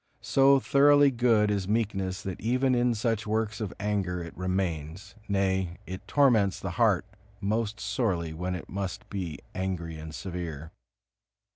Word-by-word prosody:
So 135 Hz, 0 st, +5 dB
thoroughly 145 Hz, +1 st, +5 dB
good 115 Hz, -4 st, +3 dB
is 100 Hz, -2 st, -1 dB
meekness 100 Hz, -3 st, -1 dB
that 95 Hz, -3 st, -5 dB
even 130 Hz, +3 st, +2 dB
in 120 Hz, -1 st, +2 dB
such 110 Hz, -1 st, -1 dB
works 110 Hz, +1 st, -1 dB
of 105 Hz, -4 st, -3 dB
anger 100 Hz, -4 st, -1 dB
it 85 Hz, -, -9 dB
remains, 90 Hz, -2 st, -3 dB
nay, 95 Hz, -3 st, 0 dB
it 95 Hz, +1 st, -8 dB
torments 115 Hz, -9 st, +3 dB
the 95 Hz, -, -4 dB
heart 105 Hz, -6 st, +2 dB, 0.3 s
most 110 Hz, +1 st, -1 dB
sorely 90 Hz, -12 st, -1 dB
when 90 Hz, +3 st, -3 dB
it 90 Hz, -, -7 dB
must 95 Hz, -1 st, -5 dB
be 90 Hz, -6 st, -4 dB, 0.2 s
angry 90 Hz, -4 st, -3 dB
and 80 Hz, 0 st, -7 dB
severe. 80 Hz, -1 st, -6 dB
100 Hz, 145 wpm, -28 LUFS, 90-115 Hz, 0.3 s, So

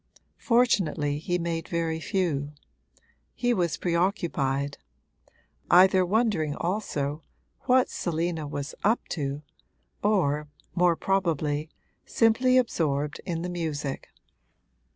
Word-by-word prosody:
Fortunately 175 Hz, -, +2 dB
he 175 Hz, +3 st, -1 dB
made 165 Hz, -1 st, -3 dB
very 165 Hz, -1 st, -1 dB
few; 160 Hz, -6 st, -1 dB, 0.8 s
he 245 Hz, 0 st, +1 dB
was 170 Hz, -7 st, 0 dB
preoccupied 170 Hz, -6 st, 0 dB, 0.9 s
either 185 Hz, +1 st, +6 dB
wondering 180 Hz, -7 st, +1 dB
also 155 Hz, -6 st, -2 dB, 0.4 s
what 255 Hz, 0 st, +4 dB
Selina 165 Hz, -2 st, -2 dB
was 145 Hz, 0 st, -5 dB
'up 220 Hz, +4 st, +2 dB
to' 145 Hz, -1 st, -3 dB, 0.6 s
or, 150 Hz, -8 st, +1 dB, 0.3 s
more 175 Hz, -1 st, +3 dB
probably, 160 Hz, -6 st, 0 dB, 0.3 s
simply 250 Hz, +3 st, +3 dB
absorbed 150 Hz, -, 0 dB
in 170 Hz, -2 st, -2 dB
the -, -, -2 dB
music. 155 Hz, -5 st, -3 dB
170 Hz, 95 wpm, -27 LUFS, 150-195 Hz, 0.9 s, either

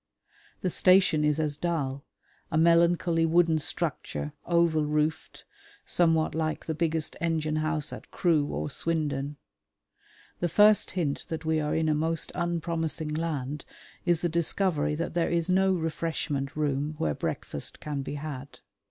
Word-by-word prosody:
The 185 Hz, -, 0 dB
station 185 Hz, -5 st, +4 dB
is 150 Hz, 0 st, +2 dB
as 150 Hz, -2 st, 0 dB
dull: 145 Hz, -5 st, -2 dB, 0.5 s
a 155 Hz, -, +1 dB
melancholy 170 Hz, 0 st, +4 dB
wooden 165 Hz, -1 st, +3 dB
structure, 150 Hz, -1 st, -3 dB
oval 170 Hz, -2 st, +3 dB
roofed, 150 Hz, +1 st, -1 dB, 0.4 s
somewhat 165 Hz, -2 st, +2 dB
like 155 Hz, -1 st, -2 dB
the 160 Hz, -, -2 dB
biggest 160 Hz, -1 st, -1 dB
engine 155 Hz, -2 st, 0 dB
house 155 Hz, -1 st, -1 dB
at -, -, -10 dB
Crewe 160 Hz, -5 st, +2 dB
or 145 Hz, -, -3 dB
Swindon. 145 Hz, -3 st, -1 dB, 1.0 s
The 175 Hz, -, 0 dB
first 210 Hz, +4 st, +5 dB
hint 150 Hz, -6 st, -1 dB
that 160 Hz, -1 st, -5 dB
we 160 Hz, 0 st, +2 dB
are 150 Hz, -1 st, -1 dB
in 160 Hz, 0 st, +1 dB
a 155 Hz, -, +3 dB
most 160 Hz, +2 st, -1 dB
unpromising 165 Hz, -3 st, -2 dB
land 150 Hz, -3 st, -3 dB, 0.4 s
is 175 Hz, -2 st, +2 dB
the 175 Hz, -, +1 dB
discovery 165 Hz, -2 st, +1 dB
that 165 Hz, +3 st, -3 dB
there 170 Hz, -1 st, +1 dB
is 170 Hz, +1 st, 0 dB
no 190 Hz, +1 st, +4 dB
refreshment 160 Hz, -5 st, -2 dB
room 150 Hz, 0 st, -1 dB
where 75 Hz, -2 st, 0 dB
breakfast -, -, -3 dB
can 145 Hz, -2 st, -4 dB
be 140 Hz, -, -5 dB
had. 145 Hz, -2 st, -7 dB
160 Hz, 145 wpm, -28 LUFS, 150-170 Hz, 1.0 s, first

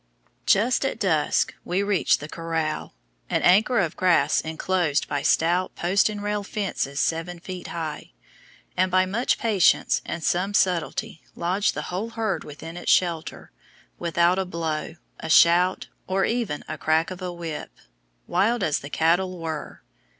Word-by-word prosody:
Just 230 Hz, +7 st, +3 dB
at 270 Hz, -, -2 dB
dusk 160 Hz, -7 st, +1 dB
we 185 Hz, +3 st, -1 dB
reached 200 Hz, -7 st, +2 dB
the 145 Hz, -, -6 dB
corral 160 Hz, -, -3 dB, 0.3 s
an -, -, 0 dB
acre 215 Hz, +7 st, +4 dB
of 170 Hz, -7 st, +1 dB
grass 180 Hz, -2 st, +3 dB
enclosed 160 Hz, -1 st, -1 dB
by 145 Hz, -1 st, -2 dB
stout 175 Hz, +5 st, +1 dB
post 185 Hz, +4 st, +2 dB
and 205 Hz, -1 st, -5 dB
rail 210 Hz, 0 st, -1 dB
fences 190 Hz, -9 st, -3 dB
seven 165 Hz, +2 st, -1 dB
feet 180 Hz, 0 st, -7 dB
high 155 Hz, -, -5 dB, 0.6 s
and 185 Hz, +1 st, +2 dB
by 185 Hz, 0 st, +3 dB
much 220 Hz, +7 st, 0 dB
patience 210 Hz, -7 st, +3 dB
and 170 Hz, -, -5 dB
some 190 Hz, +6 st, 0 dB
subtlety 170 Hz, -4 st, 0 dB
lodged 185 Hz, +4 st, 0 dB
the -, -, -3 dB
whole 205 Hz, +5 st, -2 dB
herd 225 Hz, -5 st, -2 dB
within 160 Hz, +3 st, -9 dB
its 175 Hz, -, 0 dB
shelter, 165 Hz, -4 st, 0 dB, 0.5 s
without 170 Hz, +2 st, +2 dB
a 190 Hz, -, 0 dB
blow, 160 Hz, -2 st, -3 dB, 0.2 s
a -, -, -6 dB
shout, 175 Hz, +3 st, +5 dB, 0.2 s
or 190 Hz, +1 st, +1 dB
even 230 Hz, -11 st, -2 dB
a 155 Hz, -, -6 dB
crack 160 Hz, +3 st, +1 dB
of 185 Hz, 0 st, -7 dB
a 180 Hz, -1 st, -3 dB
whip, 170 Hz, -3 st, -6 dB, 0.6 s
wild 205 Hz, +5 st, +1 dB
as 150 Hz, -4 st, +1 dB
the 145 Hz, -, -9 dB
cattle 175 Hz, +4 st, +1 dB
were. 160 Hz, -2 st, -6 dB
175 Hz, 155 wpm, -24 LUFS, 160-195 Hz, 0.6 s, shout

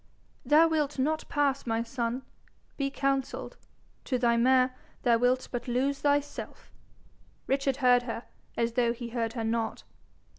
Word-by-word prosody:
'Thou 300 Hz, +5 st, +6 dB
wilt 300 Hz, -3 st, 0 dB
not 310 Hz, +4 st, 0 dB
pass, 280 Hz, -3 st, 0 dB
my 225 Hz, 0 st, 0 dB
son. 235 Hz, +1 st, -3 dB, 0.5 s
Be 275 Hz, -1 st, -1 dB
counselled. 275 Hz, -1 st, -2 dB, 0.5 s
To 255 Hz, -, 0 dB
thy 240 Hz, -1 st, +3 dB
mare, 255 Hz, +1 st, +3 dB, 0.3 s
thou 235 Hz, -2 st, +4 dB
wilt 250 Hz, +1 st, +2 dB
but 245 Hz, 0 st, -4 dB
lose 265 Hz, +3 st, 0 dB
thyself.' 290 Hz, 0 st, -2 dB, 0.7 s
Richard 275 Hz, 0 st, +1 dB
heard 245 Hz, -1 st, +6 dB
her 230 Hz, +1 st, -4 dB, 0.3 s
as 230 Hz, 0 st, +1 dB
though 235 Hz, 0 st, +2 dB
he 240 Hz, 0 st, -7 dB
heard 230 Hz, -1 st, -2 dB
her 230 Hz, -2 st, -3 dB
not. 225 Hz, 0 st, -2 dB
255 Hz, 145 wpm, -29 LUFS, 235-275 Hz, 0.7 s, Thou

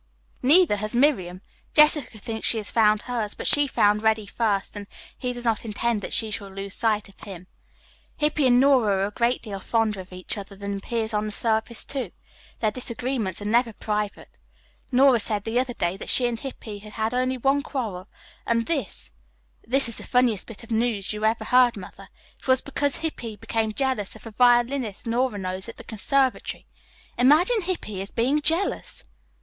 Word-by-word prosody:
Neither 300 Hz, -, +5 dB
has 215 Hz, +3 st, -2 dB
Miriam. 190 Hz, -10 st, +2 dB, 0.3 s
Jessica 300 Hz, -6 st, +4 dB
thinks 220 Hz, +1 st, -3 dB
she 230 Hz, -, +2 dB
has 210 Hz, -2 st, -5 dB
found 215 Hz, -2 st, +3 dB
hers, 230 Hz, -4 st, -3 dB
but -, -, -7 dB
she 290 Hz, -1 st, +5 dB
found 210 Hz, -4 st, +2 dB
Reddy 220 Hz, -1 st, +2 dB
first, 205 Hz, -1 st, -1 dB
and 205 Hz, -1 st, -7 dB, 0.3 s
he 250 Hz, -, -3 dB
does 245 Hz, 0 st, -7 dB
not 225 Hz, -2 st, +1 dB
intend 225 Hz, 0 st, -1 dB
that -, -, -6 dB
she 220 Hz, -2 st, +1 dB
shall 200 Hz, -1 st, -5 dB
lose 195 Hz, 0 st, -6 dB
sight 215 Hz, -2 st, 0 dB
of 195 Hz, -, -20 dB
him. 185 Hz, -3 st, -9 dB, 0.7 s
Hippy 300 Hz, -2 st, +2 dB
and 245 Hz, 0 st, +5 dB
Nora 240 Hz, -8 st, +4 dB
are -, -, +2 dB
a 205 Hz, -, -4 dB
great 235 Hz, +3 st, 0 dB
deal 200 Hz, -4 st, -6 dB
fonder 215 Hz, 0 st, 0 dB
of 185 Hz, 0 st, -10 dB
each 185 Hz, +3 st, -5 dB
other 200 Hz, 0 st, -10 dB
than 200 Hz, 0 st, -4 dB
appears 220 Hz, +2 st, -3 dB
on 210 Hz, 0 st, 0 dB
the -, -, -4 dB
surface, 220 Hz, +2 st, +1 dB
too. 260 Hz, -8 st, -4 dB, 0.5 s
Their 215 Hz, -2 st, +2 dB
disagreements 235 Hz, -4 st, -3 dB
are -, -, -7 dB
never 230 Hz, +2 st, +2 dB
private. 210 Hz, -1 st, -4 dB, 0.5 s
Nora 260 Hz, -1 st, +5 dB
said 210 Hz, -1 st, +1 dB
the 230 Hz, +3 st, 0 dB
other 250 Hz, -1 st, -2 dB
day 175 Hz, +2 st, -1 dB
that -, -, -6 dB
she 250 Hz, -, +5 dB
and 235 Hz, -2 st, -1 dB
Hippy 220 Hz, -6 st, -8 dB
had 210 Hz, +1 st, -12 dB
had 220 Hz, +1 st, -1 dB
only 255 Hz, +1 st, 0 dB
one 270 Hz, +3 st, +2 dB
quarrel, 215 Hz, -10 st, -5 dB, 0.4 s
and 230 Hz, 0 st, +1 dB
this 270 Hz, -, -3 dB, 0.6 s
is 255 Hz, -3 st, +1 dB
the -, -, -8 dB
funniest 245 Hz, -5 st, +1 dB
bit 230 Hz, 0 st, -9 dB
of 230 Hz, -, -13 dB
news 220 Hz, -3 st, 0 dB
you 210 Hz, +1 st, -2 dB
ever 220 Hz, 0 st, +1 dB
heard, 250 Hz, 0 st, +4 dB
Mother 190 Hz, -, -11 dB, 0.3 s
it -, -, -15 dB
was 260 Hz, -1 st, +4 dB
because 285 Hz, 0 st, -1 dB
Hippy 240 Hz, -9 st, -4 dB
became 220 Hz, +1 st, -2 dB
jealous 255 Hz, -4 st, -1 dB
of -, -, -14 dB
a 225 Hz, -, -8 dB
violinist 240 Hz, -1 st, +2 dB
Nora 240 Hz, -1 st, 0 dB
knows 185 Hz, +2 st, -5 dB
at -, -, -10 dB
the -, -, -10 dB
conservatory. 260 Hz, +4 st, -1 dB, 0.5 s
Imagine 325 Hz, -, +4 dB
Hippy 335 Hz, -, -4 dB
as 195 Hz, -, -6 dB
being 265 Hz, +6 st, +1 dB
jealous!" 325 Hz, +6 st, 0 dB
225 Hz, 190 wpm, -24 LUFS, 205-255 Hz, 0.7 s, Neither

